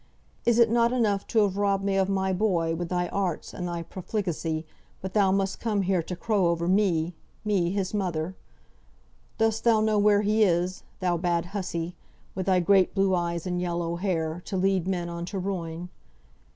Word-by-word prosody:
Is 235 -1 +4
it 230 -2 +5
not 235 0 +3
enough 215 -6 +1
to 225 - +3
have 200 -1 0
robbed 200 -1 +1
me 195 -1 0
of 195 0 +2
my 190 -1 +1
boy 180 -4 +1
with 170 +1 -3
thy 175 -1 0
arts 185 -5 -2
and 180 - -4
thy 170 -1 -3
profligacy, 170 -4 -3 0.3
but 190 0 -6
thou 200 -3 +4
must 195 0 0
come 210 -4 0
here 185 -1 +1
to 180 +3 -5
crow 200 -1 +1
over 170 0 0
me 180 -4 +2 0.3
me 195 -5 +2
his 195 0 -2
mother? 180 -3 -2 1.0
Dost 225 0 +1
thou 230 -2 +4
know 215 -1 +2
where 205 0 +4
he 215 +2 +2
is, 180 -1 +1 0.2
thou 175 -2 +1
bad 170 -1 0
hussy, 175 -4 -3 0.4
with 185 0 -4
thy 185 -1 +4
great 190 +2 +3
blue 195 -1 +3
eyes 170 -2 -1
and 180 -1 -1
yellow 170 -1 -2
hair, 170 -3 -1
to 190 - -3
lead 190 -1 +1
men 180 -2 -1
on 170 0 -5
to 195 +3 -5
ruin? 180 -2 -4
185 Hz, 190 wpm, -27 LUFS, 175-200 Hz, 1.0 s, it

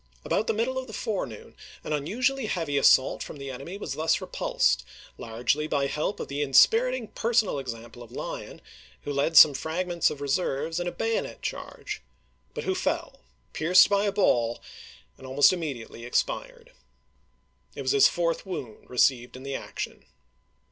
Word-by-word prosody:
About 220 - 0
the - - +2
middle 245 +4 -1
of 260 - -7
the 220 - -10
forenoon 185 - -4 0.3
an 155 - -3
unusually 240 - 0
heavy 165 -7 -2
assault 135 -1 +4
from - - -7
the 140 -1 -6
enemy 140 +9 -7
was - - -5
thus 160 +1 +1
repulsed, 65 - 0 0.3
largely 120 +7 -1
by 140 -3 0
help 150 +8 -2
of - - -4
the 140 +1 -3
in 135 -2 -2
spiriting 240 - +5
personal 225 -9 +1
example 120 -2 -8
of 120 -1 -12
Lyon, - - -6 0.4
who 145 - -3
led 145 +4 +1
some 150 - +10
fragments 170 +5 0
of 145 - -7
reserves 150 +2 -1
in 175 - -2
a - - -1
bayonet 225 +4 -3
charge, - - -5 0.5
but - - -4
who - - 0
fell, - - -2 0.3
pierced 180 +5 +5
by 200 +1 +3
a 200 - +1
ball, 120 - +2 0.6
and 130 - -10
almost 140 +6 +5
immediately 140 -10 -5
expu'ed. - - -2 1.1
It - - -5
was - - +1
his 415 -1 +6
fourth 170 -1 -1
wound 135 - -7
received 125 -1 +2
in 130 - -11
the 140 0 -5
action. - - -6
155 Hz, 165 wpm, -27 LUFS, 135-205 Hz, 1.1 s, some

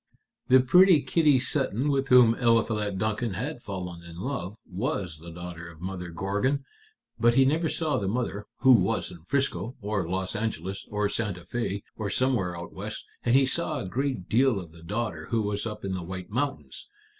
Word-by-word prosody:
"The 130 - +7
pretty 180 +4 +6
Kitty 150 -5 +4
Sutton 135 0 0
with 135 -1 +1
whom 125 -3 +7
Eliphalet 115 -4 +1
Duncan 110 0 -1
had 125 - -4
fallen 90 -5 -6
in 85 -1 -11
love 105 -2 -4
was 95 - -3
the 85 +2 -10
daughter 85 0 -8
of 80 -2 -14
Mother 90 0 -5
Gorgon. 105 +11 -1 0.5
But 120 0 +4
he 135 +1 +6
never 160 +4 +2
saw 155 -6 0
the 100 - -2
mother, 105 -1 -2
who 130 -1 +8
was 95 - -1
in 90 - -11
Frisco, 135 -1 -1
or 100 -4 -2
Los 95 +3 -2
Angeles, 95 -3 -3
or 105 0 0
Santa 100 -4 -2
Fé, 100 +2 -3
or 105 -2 -3
somewhere 100 -8 +1
out 85 0 -8
West, - - -6 0.2
and 120 +1 +3
he 135 0 +6
saw 155 +3 -1
a - - -4
great 130 -3 -2
deal 125 -2 +3
of 85 -4 -9
the 85 0 -14
daughter, 105 +6 -3
who 115 -2 +1
was 105 +1 -1
up 105 -2 -6
in 95 - -2
the 95 - -3
White 90 +2 -7
Mountains. 140 - -3
105 Hz, 190 wpm, -27 LUFS, 95-130 Hz, 0.5 s, who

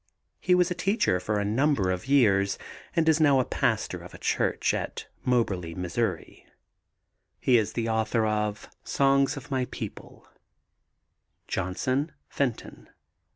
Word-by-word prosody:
He 180 - +3
was 180 0 +2
a - - +2
teacher 185 - +1
for 105 +4 -1
a 100 - -1
number 110 -3 +2
of 90 +5 -4
years 100 -8 +3 0.4
and 165 -1 +2
is 160 0 +4
now 140 -3 +5
a 130 - +1
pastor - - -1
of - - -12
a - - -9
church - - 0
at - - -4 0.2
Moberly, 95 -9 0
Mo. 90 -1 -4 1.5
He 125 - +4
is 110 0 -2
the 115 -1 -1
author 110 0 +1
of 105 -1 -1 0.2
Songs 140 +1 +2
of 145 +1 -9
My 130 -1 +1
People. - - -9 1.2
JOHNSON, 130 - -1 0.2
FENTON. 130 -5 -3
120 Hz, 140 wpm, -27 LUFS, 105-140 Hz, 1.5 s, now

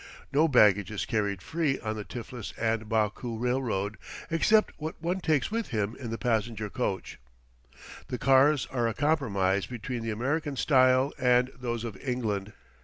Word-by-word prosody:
No 155 +4 +4
baggage 105 - +5
is 105 -2 -3
carried 100 -4 -1
free 160 -4 0
on 110 -1 -3
the 105 - -5
Tiflis 120 0 -7 0.3
& - - -14
Baku 110 +2 -1
Railroad 120 -4 -1 0.3
except 215 +6 +3
what 155 +1 -5
one 175 +3 -1
takes 155 0 +1
with 230 0 -1
him 110 -1 -2
in 120 -4 -7
the 115 - -3
passenger 110 -3 -1
coach. - - -3 0.9
The 125 - -3
cars 135 +3 +4
are 120 -3 +1
a 115 - -2
compromise 100 -11 +1
between 120 0 -5
the 115 - -3
American 140 +7 -1
style 130 +1 +4
and 125 0 +3
those 120 -2 -3
of 115 -4 -5
England. 110 -5 -3
120 Hz, 160 wpm, -28 LUFS, 110-135 Hz, 0.9 s, baggage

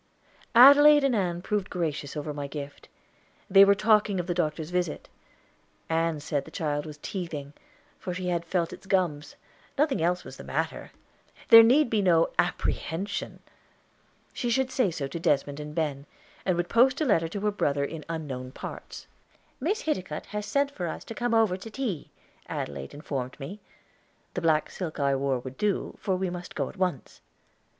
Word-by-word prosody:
Adelaide 290 +4 +9
and 270 -3 +2
Ann 175 -4 -1
proved 205 -2 -1
gracious 155 -5 -3
over 150 0 -4
my 145 -1 -4
gift. 145 0 -8 0.6
They 195 +1 +9
were 200 0 +6
talking 210 -2 +3
of 175 - -2
the 175 - -1
doctor's 160 -1 -2
visit. 180 -3 -2 0.8
Ann 165 -1 0
said 145 -1 -2
the - - -12
child 145 -1 -2
was 150 -1 -9
teething, 155 -7 -5 0.5
for 180 - -5
she 180 0 -3
had 170 -1 0
felt 170 0 -1
its - - -12
gums; 160 -7 0 0.4
nothing 285 - +2
else 180 +2 +1
was - - -10
the - - -9
matter. - - -3 0.6
There 230 - +12
need 250 +4 +4
be 215 -2 +2
no 170 -4 +3
apprehension. 190 +6 -2 0.9
She 240 - -2
should 260 +2 +1
say 250 -6 +2
so 155 -4 -4
to 150 +5 -6
Desmond 145 -3 0
and 150 0 -7
Ben, 145 -3 -2 0.4
and 180 -2 +2
would 175 0 0
post 255 +5 +4
a 310 - +1
letter 165 - +2
to 200 +4 -5
her 210 0 +1
brother 140 -8 0
in 155 +1 -7
unknown 135 -6 -5
parts. - - -8 0.5
"Miss 390 - -1
Hiticutt 185 - -3
has 210 0 -5
sent 280 0 +1
for 180 -10 -4
us - - -5
to - - -8
come 240 +1 0
over 220 -5 +3
to 210 +4 -9
tea," 220 - -4 0.4
Adelaide 70 - -5
informed 135 -3 -5
me. 170 +10 -7 0.7
The 180 - -3
black 160 -2 +2
silk 170 -5 -5
I 140 -1 +2
wore 135 -1 0
would 130 +1 -8
do, 210 -2 -1
for 190 - 0
we 185 -1 -2
must 175 -1 -8
go - - -1
at - - -13
once. 180 -8 -3
175 Hz, 180 wpm, -27 LUFS, 150-210 Hz, 0.9 s, There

